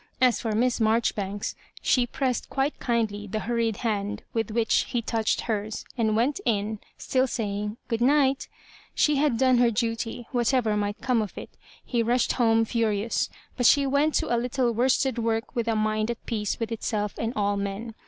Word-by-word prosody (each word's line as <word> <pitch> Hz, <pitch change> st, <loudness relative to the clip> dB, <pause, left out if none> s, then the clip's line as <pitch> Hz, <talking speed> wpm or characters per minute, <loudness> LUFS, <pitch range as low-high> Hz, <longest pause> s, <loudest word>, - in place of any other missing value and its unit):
As 250 Hz, -2 st, +3 dB
for 225 Hz, -3 st, -1 dB
Miss 245 Hz, +3 st, +1 dB
Marjori 225 Hz, +1 st, +2 dB
banks, 200 Hz, 0 st, -4 dB, 0.2 s
she 245 Hz, -2 st, +2 dB
pressed 255 Hz, -1 st, -2 dB
quite 275 Hz, +2 st, -1 dB
kindly 220 Hz, -4 st, -1 dB
the 215 Hz, +2 st, -3 dB
hurried 230 Hz, -2 st, 0 dB
hand 210 Hz, -1 st, -1 dB
with 225 Hz, -2 st, -1 dB
which 225 Hz, 0 st, +2 dB
he 240 Hz, -, 0 dB
touched 225 Hz, -1 st, 0 dB
hers, 215 Hz, -1 st, -3 dB
and 220 Hz, -3 st, +1 dB
went 250 Hz, -, +1 dB
in, 215 Hz, -1 st, 0 dB, 0.2 s
still 260 Hz, 0 st, +1 dB
saying, 210 Hz, -2 st, -3 dB
" -, -, -43 dB
Grood 230 Hz, 0 st, -2 dB
night" 275 Hz, +1 st, +3 dB, 0.5 s
She 300 Hz, -1 st, +3 dB
had 280 Hz, -4 st, +2 dB
done 255 Hz, 0 st, +4 dB
her 240 Hz, -1 st, +5 dB
duty, 230 Hz, +1 st, -2 dB
whatever 240 Hz, -3 st, +2 dB
might 205 Hz, 0 st, -2 dB
come 250 Hz, -3 st, +2 dB
of 210 Hz, -, -6 dB
it -, -, -8 dB, 0.3 s
He 240 Hz, -2 st, 0 dB
rushed 240 Hz, +2 st, +2 dB
home 225 Hz, -2 st, +3 dB
furious; 225 Hz, -1 st, 0 dB, 0.3 s
but 245 Hz, -2 st, +3 dB
she 280 Hz, -1 st, +5 dB
went 285 Hz, +3 st, +2 dB
to 240 Hz, -, +1 dB
a 235 Hz, -, +1 dB
little 250 Hz, 0 st, 0 dB
worsted 255 Hz, +1 st, +2 dB
work 225 Hz, +2 st, -1 dB
with 235 Hz, -1 st, -1 dB
a 225 Hz, -, +1 dB
mind 215 Hz, 0 st, 0 dB
at 235 Hz, -, -5 dB
peace 210 Hz, -3 st, -2 dB
with 230 Hz, -1 st, -3 dB
itself 210 Hz, -2 st, -2 dB
and 225 Hz, -, -1 dB
all 205 Hz, -1 st, +1 dB
men. 200 Hz, +3 st, -4 dB
230 Hz, 190 wpm, -26 LUFS, 215-245 Hz, 0.5 s, her